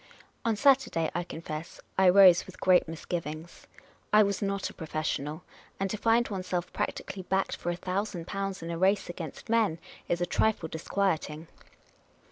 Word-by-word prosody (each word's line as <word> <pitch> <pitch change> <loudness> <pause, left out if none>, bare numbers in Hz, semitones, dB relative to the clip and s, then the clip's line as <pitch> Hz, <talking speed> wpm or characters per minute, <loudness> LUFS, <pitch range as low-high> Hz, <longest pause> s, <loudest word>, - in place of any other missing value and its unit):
On 230 -2 +1
Saturday, 255 - +3
I 175 - -1
confess, 160 -1 -7 0.2
I 190 -1 +5
rose 185 -2 +7
with 185 - -12
great 180 -2 +4
misgivings. 165 0 -6 0.4
I 215 0 +7
was 200 -1 -1
not 200 -1 -1
a - - -9
professional; 155 -1 -3 0.4
and 195 0 -1
to - - -1
find 230 +2 +3
oneself 185 -3 -3
practically 190 - -3
backed 190 +1 0
for 175 - -4
a 175 - 0
thousand 185 0 -3
pounds 195 -1 -4
in 165 - -4
a 165 - -4
race 195 +1 +2
against 165 -4 -8
men 220 -7 +2 0.3
is 175 - +1
a 175 - +1
trifle 175 -2 +1
dis 160 +1 -7
quieting. 165 -5 -1
180 Hz, 165 wpm, -29 LUFS, 165-200 Hz, 0.4 s, rose